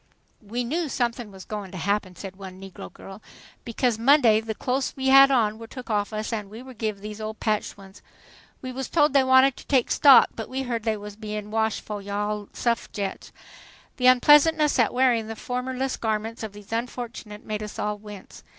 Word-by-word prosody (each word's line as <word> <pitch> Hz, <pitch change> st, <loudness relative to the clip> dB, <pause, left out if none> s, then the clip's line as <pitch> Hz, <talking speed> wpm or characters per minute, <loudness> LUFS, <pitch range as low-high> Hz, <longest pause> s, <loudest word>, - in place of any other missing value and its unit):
"We 235 Hz, +4 st, -4 dB
knew 310 Hz, +6 st, -2 dB
somethin' 240 Hz, -3 st, -2 dB
was 190 Hz, -1 st, -12 dB
goin' 210 Hz, -3 st, -6 dB
to 185 Hz, -, -8 dB
happen," 200 Hz, +1 st, -1 dB
said 190 Hz, 0 st, -8 dB
one 190 Hz, -1 st, -10 dB
negro 195 Hz, -1 st, -10 dB
girl, 195 Hz, +2 st, -12 dB, 0.4 s
"because 235 Hz, -1 st, -1 dB
Monday 235 Hz, -4 st, +5 dB
the 220 Hz, -1 st, -5 dB
close 260 Hz, +3 st, -2 dB
we 265 Hz, 0 st, -1 dB
had 275 Hz, +1 st, +8 dB
on 220 Hz, -5 st, +1 dB
wer' 225 Hz, -, -9 dB
took 250 Hz, -1 st, -8 dB
off 205 Hz, 0 st, 0 dB
us 215 Hz, +2 st, -4 dB
an' 210 Hz, -3 st, -4 dB
we 225 Hz, +4 st, -10 dB
were 260 Hz, 0 st, -11 dB
giv' 215 Hz, -3 st, -4 dB
these 210 Hz, +1 st, -8 dB
old 215 Hz, 0 st, -6 dB
patched 215 Hz, -2 st, -1 dB
ones. 195 Hz, 0 st, -15 dB, 0.6 s
We 255 Hz, -, -5 dB
wuz 265 Hz, +1 st, -4 dB
told 300 Hz, -3 st, +3 dB
they 275 Hz, -1 st, +5 dB
wanted 260 Hz, 0 st, +5 dB
to -, -, -13 dB
take 260 Hz, -4 st, +2 dB
'stock,' 275 Hz, -3 st, +7 dB
but 225 Hz, -, -6 dB
we 265 Hz, +1 st, -3 dB
heard 235 Hz, -3 st, -3 dB
they 220 Hz, -1 st, 0 dB
wuz 210 Hz, 0 st, -8 dB
bein' 210 Hz, -1 st, -6 dB
washed 220 Hz, -1 st, 0 dB
fo' 210 Hz, -1 st, -6 dB
you 200 Hz, 0 st, -7 dB
all 210 Hz, 0 st, -2 dB
suff'agettes." 220 Hz, -4 st, -3 dB, 0.7 s
The 250 Hz, -, +2 dB
unpleasantness 295 Hz, +4 st, +5 dB
at 230 Hz, -, +3 dB
wearing 245 Hz, -3 st, +2 dB
the 225 Hz, -, -6 dB
formless 255 Hz, +3 st, -3 dB
garments 220 Hz, 0 st, -3 dB
of 220 Hz, -2 st, -6 dB
these 205 Hz, 0 st, -14 dB
unfortunates 230 Hz, -2 st, -5 dB
made 215 Hz, 0 st, -4 dB
us 210 Hz, -1 st, -7 dB
all 210 Hz, 0 st, -2 dB
wince. 210 Hz, -2 st, -12 dB
225 Hz, 205 wpm, -25 LUFS, 210-255 Hz, 0.7 s, had